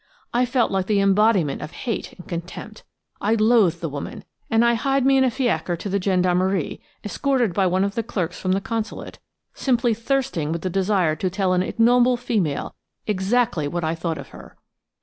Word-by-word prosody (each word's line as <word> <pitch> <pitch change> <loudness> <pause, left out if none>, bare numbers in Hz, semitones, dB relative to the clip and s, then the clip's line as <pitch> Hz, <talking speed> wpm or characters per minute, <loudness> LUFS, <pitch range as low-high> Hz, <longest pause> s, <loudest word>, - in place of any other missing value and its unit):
I 245 +1 +2
felt 245 -1 +1
like 190 -1 -1
the 210 -2 +2
embodiment 195 -6 +3
of - - -5 0.2
hate 230 -4 -3
and 180 - -14
contempt. 180 +5 -7 0.4
I 215 +3 +2
loathed 215 -5 +3
the 165 - -2
woman, 145 -1 -6 0.3
and 225 +1 +3
I 235 - +4
hied 270 +3 +1
me 270 0 +5
in 265 - +4
a 260 - +3
fiacre 220 - -1
to 200 - -5
the 200 +1 0
gendarmerie, 185 -1 +1 0.2
escorted 245 -1 0
by 190 +1 +2
one 185 +2 +1
of 200 0 -1
the 230 - -1
clerks 180 -6 -3
from 185 0 0
the 195 - 0
Consulate, 225 +1 -5 0.3
simply 240 -3 +1
thirsting 230 - -1
with 165 0 -3
the 185 - -2
desire 190 -4 +1
to 185 - -1
tell 190 0 0
an 180 - +2
ignoble 245 +4 +3
female 210 - -1 0.3
exactly 210 -4 +1
what 170 +3 -3
I 160 0 0
thought 165 -1 -3
of 140 - -9
her. - - -14
200 Hz, 190 wpm, -22 LUFS, 180-235 Hz, 0.4 s, me